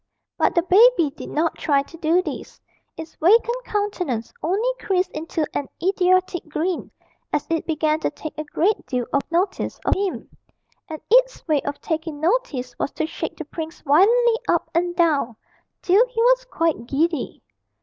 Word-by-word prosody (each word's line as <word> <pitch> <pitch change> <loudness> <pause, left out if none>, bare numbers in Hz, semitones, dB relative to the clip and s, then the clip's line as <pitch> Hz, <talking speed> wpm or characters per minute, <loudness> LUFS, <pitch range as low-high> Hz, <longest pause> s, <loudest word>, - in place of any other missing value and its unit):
But - - +1
the 340 - +3
baby 375 - +5
did 290 - -9
not 320 +2 -1
try 280 -2 +2
to 280 - -14
do 335 +2 +2
this; - - -7 0.4
its 320 0 -8
vacant 470 +7 +3
countenance 360 - -2
only 410 +9 +1
creased 370 -1 0
into 315 0 -3
an 280 - -2
idiotic 370 -2 +1
grin, 335 +3 -2 0.4
as 295 - -1
it 325 - -1
began 310 -1 +1
to - - 0
take 310 - -8
a 305 - -4
great 350 +7 0
deal 250 -3 -1
of 280 - +3
notice 365 +3 -1
of - - +3
him; 390 -2 -2 0.6
and 315 -1 -6
its - - +3
way 300 -3 +2
of 285 0 -5
taking 320 -2 -3
notice 320 - -1
was - - -1
to 315 - -1
shake 320 - -5
the 320 - -6
prince 320 +1 -7
violently 455 - +4
up - - +1
and 350 +1 0
down, 300 -9 +1 0.5
till 390 +5 +5
he 485 -2 -6
was - - +4
quite 330 - -1
giddy. 310 +1 -1
335 Hz, 170 wpm, -22 LUFS, 305-390 Hz, 0.6 s, baby